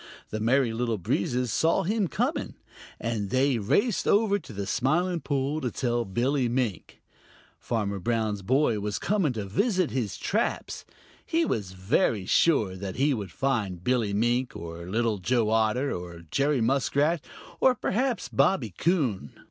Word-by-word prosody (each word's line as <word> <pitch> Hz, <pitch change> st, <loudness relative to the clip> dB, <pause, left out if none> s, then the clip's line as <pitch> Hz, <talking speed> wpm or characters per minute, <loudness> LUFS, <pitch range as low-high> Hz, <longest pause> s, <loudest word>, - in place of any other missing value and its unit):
The 110 Hz, -, -3 dB
Merry 120 Hz, +1 st, +2 dB
Little 115 Hz, -1 st, -1 dB
Breezes 120 Hz, +4 st, -1 dB
saw 160 Hz, +9 st, +2 dB
him 205 Hz, +1 st, 0 dB
coming, -, -, -2 dB, 0.4 s
and 110 Hz, -4 st, -2 dB
they 130 Hz, 0 st, +2 dB
raced 200 Hz, -, +1 dB
over 205 Hz, -1 st, +3 dB
to 145 Hz, -, -12 dB
the 100 Hz, -1 st, -4 dB
Smiling 170 Hz, -, +1 dB
Pool 145 Hz, +1 st, -1 dB
to 125 Hz, -, -1 dB
tell 120 Hz, -1 st, -1 dB
Billy 125 Hz, +5 st, 0 dB
Mink. 120 Hz, -6 st, -3 dB, 0.6 s
Farmer 100 Hz, -4 st, -2 dB
Brown's 110 Hz, -1 st, -1 dB
boy 120 Hz, +1 st, +2 dB
was 105 Hz, 0 st, -2 dB
coming 195 Hz, -10 st, +1 dB
to 105 Hz, -3 st, -4 dB
visit 185 Hz, -, +1 dB
his 115 Hz, -7 st, -2 dB
traps. 220 Hz, +5 st, -2 dB, 0.4 s
He 330 Hz, 0 st, +1 dB
was 100 Hz, -, -2 dB
very 95 Hz, +2 st, +1 dB
sure 110 Hz, -, +3 dB
that 95 Hz, 0 st, -6 dB
he 140 Hz, +2 st, +2 dB
would 100 Hz, -7 st, -4 dB
find 105 Hz, -8 st, -1 dB
Billy 120 Hz, -3 st, +1 dB
Mink 120 Hz, +5 st, 0 dB
or 85 Hz, +1 st, -7 dB
Little 110 Hz, 0 st, 0 dB
Joe 110 Hz, +3 st, +1 dB
Otter, 115 Hz, +5 st, +1 dB
or 85 Hz, -1 st, -7 dB
Jerry 140 Hz, -2 st, +2 dB
Muskrat, 140 Hz, +6 st, +1 dB, 0.4 s
or 260 Hz, -1 st, +4 dB
perhaps 245 Hz, +2 st, -1 dB
Bobby 120 Hz, -, +1 dB
Coon. 130 Hz, -, 0 dB
120 Hz, 150 wpm, -27 LUFS, 105-145 Hz, 0.6 s, or